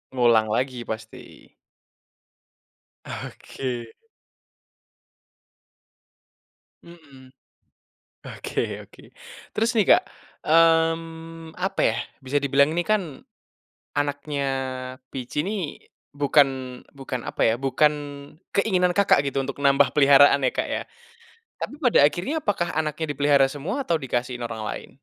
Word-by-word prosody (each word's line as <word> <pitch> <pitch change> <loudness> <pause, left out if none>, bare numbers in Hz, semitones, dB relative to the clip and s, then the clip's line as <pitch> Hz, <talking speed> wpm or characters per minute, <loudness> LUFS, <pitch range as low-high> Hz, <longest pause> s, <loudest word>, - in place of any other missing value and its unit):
Ngulang 115 -3 +4
lagi 125 -1 -2
pasti. 110 0 -9 1.6
Oke. 125 -3 -6 3.0
Mhm. 140 -7 -16 0.9
Oke - - -4
oke - - -19 0.5
terus 225 +3 +1
nih, 215 -4 +3
Kak, - - -3 0.4
mmm, 165 0 +1
apa 190 +1 -2
ya, 110 - -1 0.3
bisa 135 +2 -1
dibilang 140 +1 +4
ini 175 - +1
kan 215 -1 +2 1.0
anaknya 145 0 -2 0.6
Pici 130 +2 -3
ini, 190 -3 -4 0.3
bukan 145 0 +4 0.5
bukan 130 -3 -6
apa - - -5
ya, - - +2
bukan 135 +3 +2 0.6
keinginan 185 -3 +2
Kakak 195 -7 +3
gitu 135 0 -1
untuk 135 - -5
nambah 140 0 +4
peliharaan 140 -1 +6
ya, 130 - +2
Kak, - - -2
ya. - - -2 0.8
Tapi - - -4
pada 255 -6 +3
akhirnya 175 - -3
apakah 185 -7 -1
anaknya 155 0 -2
dipelihara 145 -1 +4
semua 195 - -4
atau 170 - 0
dikasihin 125 -2 -3
orang 115 -2 -5
lain? - - -6
145 Hz, 110 wpm, -24 LUFS, 135-165 Hz, 3.0 s, peliharaan